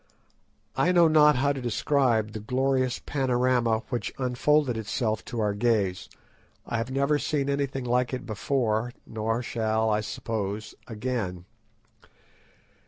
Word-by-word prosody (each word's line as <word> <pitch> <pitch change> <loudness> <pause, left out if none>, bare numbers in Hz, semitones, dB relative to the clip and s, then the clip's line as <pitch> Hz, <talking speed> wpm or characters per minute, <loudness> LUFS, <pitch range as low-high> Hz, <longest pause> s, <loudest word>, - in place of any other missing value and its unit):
I 180 - +3
know 175 -2 +6
not 150 -2 +6
how 140 +3 +2
to 135 - -6
describe 120 -2 +1
the 110 - -6
glorious 130 +2 0
panorama 125 -4 +1
which 120 -2 -2
unfolded 130 +1 +2
itself 110 0 -2
to 120 - -5
our 105 -2 +1
gaze. 100 -4 0 0.6
I 115 - -2
have 115 +2 -2
never 140 +3 +1
seen 140 -2 -1
anything 140 -2 -2
like 125 0 +1
it 130 - -4
before, 115 +1 -1
nor 115 +2 -2
shall, 110 -1 0
I 105 0 +1
suppose, 105 -1 -4
again. 105 -6 -3
120 Hz, 130 wpm, -27 LUFS, 110-135 Hz, 0.6 s, know